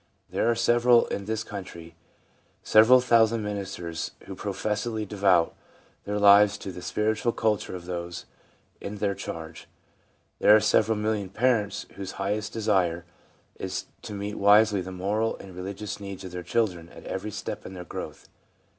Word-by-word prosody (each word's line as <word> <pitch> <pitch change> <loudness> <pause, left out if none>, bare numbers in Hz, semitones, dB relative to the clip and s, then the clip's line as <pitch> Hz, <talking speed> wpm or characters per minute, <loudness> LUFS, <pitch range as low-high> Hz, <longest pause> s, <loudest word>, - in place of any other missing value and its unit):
There - - +1
are 120 +1 +4
in 100 - -3
this 110 +1 -2
country 90 -6 -9 0.7
several 115 +4 +6
thousand 115 -2 +3
ministers 95 -5 -4
who - - -7
professedly 110 +1 -3
devote 95 -4 +2 0.5
their 105 +1 -2
lives 100 0 +6
to 95 - -7
the 90 - -9
spiritual 110 +4 0
culture 105 -4 -1
of 90 -1 -8
those 85 -1 -5 0.6
in 100 - -5
their 100 -1 0
charge; 80 -3 -8 0.7
there 105 - +7
are - - +6
several 110 +1 +2
million 105 -2 -1
parents, 105 -2 0
whose 100 -1 -6
highest 105 +2 -2
desire 95 -6 0 0.5
is - - -4 0.2
to - - -8
meet 100 +1 -5
wisely 105 0 +5
the 95 - -7
moral 105 +5 -1
and 95 -2 -12
religious 100 +3 -6
needs 100 -2 -7
of 95 - -8
their 90 0 -5
children 90 -4 -1
at - - -13
every - - -4
step - - -6
in 95 - -9
their 90 -1 -8
growth. - - -8
100 Hz, 155 wpm, -26 LUFS, 95-110 Hz, 0.7 s, there